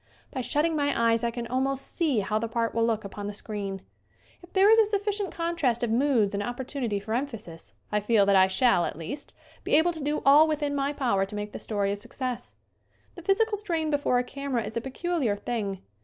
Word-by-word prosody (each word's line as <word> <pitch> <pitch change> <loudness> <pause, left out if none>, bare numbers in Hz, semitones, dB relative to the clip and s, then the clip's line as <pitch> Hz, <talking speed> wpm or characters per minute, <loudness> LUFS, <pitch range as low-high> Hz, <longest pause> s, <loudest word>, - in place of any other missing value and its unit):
By 260 - -3
shutting 305 +6 +1
my 285 -3 0
eyes 230 0 +1
I 235 - +2
can 235 0 -5
almost 265 +3 0
see 290 -10 +2
how 210 +2 -1
the 230 - -2
part 230 0 -1
will 230 - +1
look 220 -2 0
upon 200 +1 -6
the 205 - -5
screen. 200 -3 -5 0.6
If 350 - -16
there 395 +2 +6
is 450 - +7
a 445 - +6
sufficient 410 -1 -1
contrast 335 -9 0
of 235 - 0
moods 235 -5 +2
and 200 - -1
opportunity 245 -1 -3
for 215 +2 -5
emphasis 230 - -5 0.2
I 210 - +2
feel 210 -1 +3
that 200 0 +4
I 190 0 +6
shall, 190 -2 +3
at - - -5
least, 175 - -7 0.3
be - - +2
able 325 +3 +4
to 320 -2 -8
do 295 +1 -1
all 290 +3 +7
within 295 -2 -1
my 280 0 0
power 240 -9 +1
to 210 - -8
make 205 0 -4
the - - -7
story 200 -2 -1
a - - -1
success. 250 +4 -6 0.6
The 345 - -10
physical 415 +4 +2
strain 335 -6 -2
before 285 -3 +2
a 245 - +2
camera 270 -2 -3
is 215 +1 -6
a 230 - -1
pe 265 - -6
culiar 270 - -1
thing. 205 -6 -3
245 Hz, 225 wpm, -27 LUFS, 210-300 Hz, 0.6 s, is